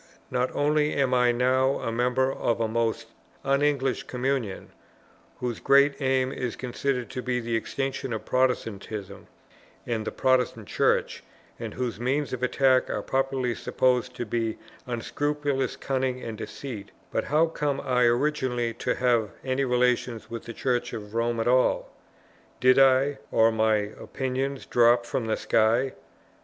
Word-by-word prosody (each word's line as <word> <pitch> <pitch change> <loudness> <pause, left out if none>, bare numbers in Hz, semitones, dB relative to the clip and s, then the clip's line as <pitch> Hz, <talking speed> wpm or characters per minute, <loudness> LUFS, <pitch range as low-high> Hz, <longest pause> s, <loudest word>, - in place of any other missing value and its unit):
Not 125 0 +1
only 150 +1 +2
am 135 -2 +1
I 125 -1 +4
now 130 +2 +2
a 115 - -3
member 125 +3 +1
of 120 -1 -1
a 115 - +1
most 115 0 -1 0.4
un 140 +1 +2
English 135 -4 +1
communion, 125 -5 -2 0.7
whose 120 -2 -3
great 140 +1 +4
aim 130 -1 +1
is 125 -3 -3
considered 125 0 -2
to 130 - -4
be 125 0 -1
the 115 -1 -2
extinction 135 +2 -3
of 110 - -4
Protestantism 115 -5 -2 0.6
and 115 -2 -2
the - - -3
Protestant 125 -5 +1
Church, - - +1 0.4
and - - -6
whose 120 -4 -3
means 135 +3 -1
of 125 - -4
attack 130 0 +3
are - - -2
popularly 135 -2 0
supposed 125 +1 0
to 120 - -4
be 115 0 -2 0.3
unscrupulous 140 +2 -1
cunning 130 -1 -1
and 115 -1 -5
deceit, 115 -1 -7 0.2
but - - -1
how 155 +3 +3
came 150 -4 -2
I 125 -1 +2
originally 120 -2 +1
to 115 - -2
have 120 -4 +2 0.2
any 130 +1 0
relations 125 -2 0
with 115 - -6
the 115 - -7
Church 125 0 -1
of 105 -2 -7
Rome 115 0 0
at 115 - 0
all? 125 +1 +2 0.7
did 130 +3 +5
I, 135 +1 +4
or 115 0 +4
my 110 0 +2
opinions, 130 +6 -3
drop 120 0 +4
from 120 -1 -2
the 110 - 0
sky? 115 +4 +2
125 Hz, 150 wpm, -26 LUFS, 115-135 Hz, 0.7 s, did